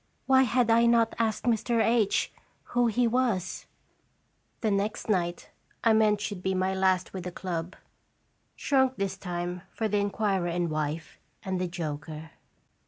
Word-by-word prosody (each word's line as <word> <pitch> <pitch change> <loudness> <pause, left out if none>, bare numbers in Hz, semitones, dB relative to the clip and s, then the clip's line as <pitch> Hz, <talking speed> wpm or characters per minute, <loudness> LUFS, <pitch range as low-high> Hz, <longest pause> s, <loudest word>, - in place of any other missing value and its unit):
Why 265 0 +5
had 240 -1 +3
I 235 +1 +5
not 230 -1 +3
asked 220 -2 0
Mr. 235 0 +1
H 225 -2 +2 0.4
who 245 -1 +3
he 240 +2 +2
was? 230 -7 -1 0.9
The 220 - +1
next 200 +3 -1
night 175 -4 -1 0.3
I 225 - +5
meant 215 -1 +3
should 205 -4 -4
be 190 0 -1
my 185 +1 +1
last 190 -1 +1
with 185 -2 -5
the 180 - -4
club, 175 -1 -4 0.8
shrunk 265 -2 +2
this 195 -1 -2
time 180 -1 -4 0.2
to* 220 - +1
the 210 -1 +1
inquirer 200 -2 0
and 170 -1 -1
wife, 155 +1 -3 0.2
and 185 -1 -2
the 180 - 0
joker. 155 -2 -6
195 Hz, 155 wpm, -28 LUFS, 180-225 Hz, 0.9 s, Why